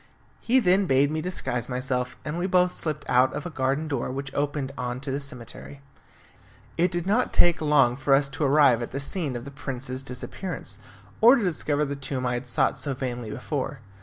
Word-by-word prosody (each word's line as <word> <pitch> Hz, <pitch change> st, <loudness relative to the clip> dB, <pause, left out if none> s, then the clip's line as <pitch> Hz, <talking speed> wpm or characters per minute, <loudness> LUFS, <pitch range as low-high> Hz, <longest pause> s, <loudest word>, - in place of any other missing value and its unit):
He 245 Hz, +3 st, +2 dB
then 190 Hz, -3 st, +3 dB
bade 140 Hz, +1 st, +3 dB
me 155 Hz, 0 st, -1 dB
disguise 130 Hz, -9 st, -2 dB
myself, 125 Hz, 0 st, -2 dB
and 155 Hz, +3 st, -3 dB
we 180 Hz, -, 0 dB
both 180 Hz, -1 st, +3 dB
slipped 150 Hz, -4 st, -4 dB
out 125 Hz, +1 st, +4 dB
of 150 Hz, -, -5 dB
a 175 Hz, -, -5 dB
garden 135 Hz, +2 st, -1 dB
door 140 Hz, -6 st, -2 dB
which 135 Hz, +1 st, -5 dB
opened 145 Hz, -1 st, -1 dB
on 125 Hz, -1 st, -3 dB
to 135 Hz, 0 st, -4 dB
the 140 Hz, -, -1 dB
cemetery. 140 Hz, 0 st, -8 dB, 1.0 s
It 175 Hz, +2 st, +3 dB
did 175 Hz, -1 st, -2 dB
not 215 Hz, +6 st, +2 dB
take 175 Hz, -2 st, +4 dB
long 145 Hz, -5 st, +4 dB
for 135 Hz, +1 st, +3 dB
us 140 Hz, 0 st, +2 dB
to 135 Hz, +3 st, -3 dB
arrive 140 Hz, -4 st, +5 dB
at 120 Hz, -, -4 dB
the 135 Hz, -, -4 dB
scene 140 Hz, -1 st, -2 dB
of 120 Hz, +1 st, -5 dB
the 140 Hz, -, -8 dB
prince's 130 Hz, -2 st, -5 dB
disappearance, 135 Hz, +8 st, -5 dB, 0.4 s
or 235 Hz, +4 st, +9 dB
to 240 Hz, -, 0 dB
discover 150 Hz, -4 st, 0 dB
the 140 Hz, 0 st, -3 dB
tomb 135 Hz, -2 st, -3 dB
I 125 Hz, -, 0 dB
had 120 Hz, +1 st, -4 dB
sought -, -, +1 dB
so 140 Hz, -2 st, -3 dB
vainly 125 Hz, -3 st, -4 dB
before. 135 Hz, +2 st, -4 dB
140 Hz, 205 wpm, -26 LUFS, 130-155 Hz, 1.0 s, or